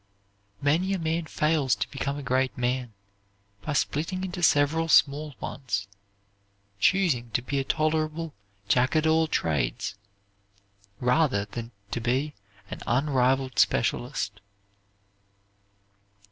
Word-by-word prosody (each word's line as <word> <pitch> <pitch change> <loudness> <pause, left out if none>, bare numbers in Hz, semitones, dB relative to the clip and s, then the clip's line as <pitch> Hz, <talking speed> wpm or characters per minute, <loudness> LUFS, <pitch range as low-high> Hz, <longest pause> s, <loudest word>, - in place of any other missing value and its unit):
Many 170 +7 +2
a - - 0
man 165 -1 -1
fails 150 -8 +1
to 100 - -2
become 140 0 -3
a 145 - -6
great 130 0 0
man, 125 -1 -1 0.7
by 150 - -3
splitting 165 +6 -1
into 180 -1 -4
several 160 +1 +3
small 150 -1 +3
ones, 100 -7 -3 0.9
choosing 155 - +2
to - - +1
be 140 +2 -1
a - - 0
tolerable 155 +2 -1 0.3
Jack 125 +7 +2
at 155 0 +3
all 160 0 +3
trades, 80 - -1 1.1
rather 125 -4 +2
than 115 +2 -7 0.2
to 120 - -2
be 130 +5 0 0.4
an - - -5
unrivalled 130 0 +1
specialist. 115 -3 +1
140 Hz, 115 wpm, -27 LUFS, 125-160 Hz, 1.1 s, several